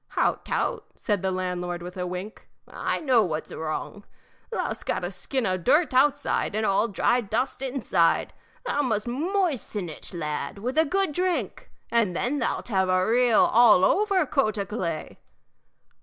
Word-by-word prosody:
"Hout -, -, +1 dB
tout!" -, -, -1 dB
said 205 Hz, -5 st, -1 dB
the 190 Hz, -, 0 dB
landlord, 180 Hz, -1 st, -3 dB
with 180 Hz, +1 st, -8 dB
a 180 Hz, -1 st, -3 dB
wink. 180 Hz, +5 st, -7 dB, 0.2 s
"I -, -, -2 dB
know 260 Hz, -7 st, +3 dB
what's 160 Hz, -6 st, -3 dB
wrong. 160 Hz, +6 st, -5 dB, 0.5 s
Thou 460 Hz, -, -2 dB
'st -, -, -12 dB
got -, -, -1 dB
a -, -, -3 dB
skin 260 Hz, -4 st, -3 dB
o' 185 Hz, -2 st, +1 dB
dirt 295 Hz, -, +2 dB
outside 275 Hz, -4 st, +2 dB
and 215 Hz, 0 st, 0 dB
all 195 Hz, +3 st, +2 dB
dry 240 Hz, +3 st, +1 dB
dust 240 Hz, +5 st, -2 dB
inside. 255 Hz, -10 st, +1 dB, 0.3 s
Thou 290 Hz, -, 0 dB
must 225 Hz, -5 st, -1 dB
moisten 275 Hz, -, -1 dB
it, 155 Hz, -, -9 dB
lad, 150 Hz, -2 st, -4 dB
with 250 Hz, +9 st, -1 dB
a 320 Hz, -, +5 dB
good 385 Hz, +2 st, 0 dB
drink, 360 Hz, +3 st, -2 dB, 0.2 s
and 225 Hz, -7 st, +2 dB
then 270 Hz, +9 st, -1 dB
thou 235 Hz, -, 0 dB
'lt -, -, -10 dB
have 190 Hz, -3 st, +1 dB
a 185 Hz, 0 st, +3 dB
real 240 Hz, 0 st, +4 dB
all 220 Hz, -5 st, +6 dB
over 395 Hz, -4 st, +2 dB
coat 260 Hz, -6 st, 0 dB
o' 200 Hz, -, -1 dB
clay." 170 Hz, -7 st, -4 dB
220 Hz, 170 wpm, -25 LUFS, 185-270 Hz, 0.5 s, all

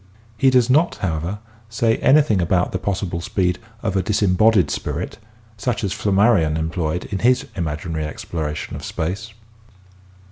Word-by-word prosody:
He 135 Hz, +5 st, +4 dB
does 125 Hz, -3 st, +4 dB
not, 155 Hz, +7 st, +3 dB
however, 85 Hz, +2 st, -2 dB, 0.3 s
say 115 Hz, 0 st, +1 dB
anything 135 Hz, -9 st, +4 dB
about 90 Hz, +1 st, +1 dB
the 95 Hz, -, -2 dB
possible 95 Hz, -3 st, -2 dB
speed 90 Hz, -2 st, 0 dB, 0.2 s
of 100 Hz, -4 st, -1 dB
a 95 Hz, -, +3 dB
dis 100 Hz, +3 st, 0 dB
embodied 100 Hz, +1 st, +4 dB
spirit -, -, -4 dB, 0.4 s
such 105 Hz, +2 st, -2 dB
as 95 Hz, -2 st, -1 dB
Flammarion 100 Hz, -7 st, +3 dB
employed 80 Hz, +1 st, -2 dB
in 100 Hz, -, -2 dB
his 125 Hz, +5 st, +3 dB
imaginary 80 Hz, -1 st, -3 dB
exploration 75 Hz, -1 st, -5 dB
of -, -, -8 dB
space. 95 Hz, +7 st, -4 dB
95 Hz, 145 wpm, -21 LUFS, 85-110 Hz, 0.4 s, He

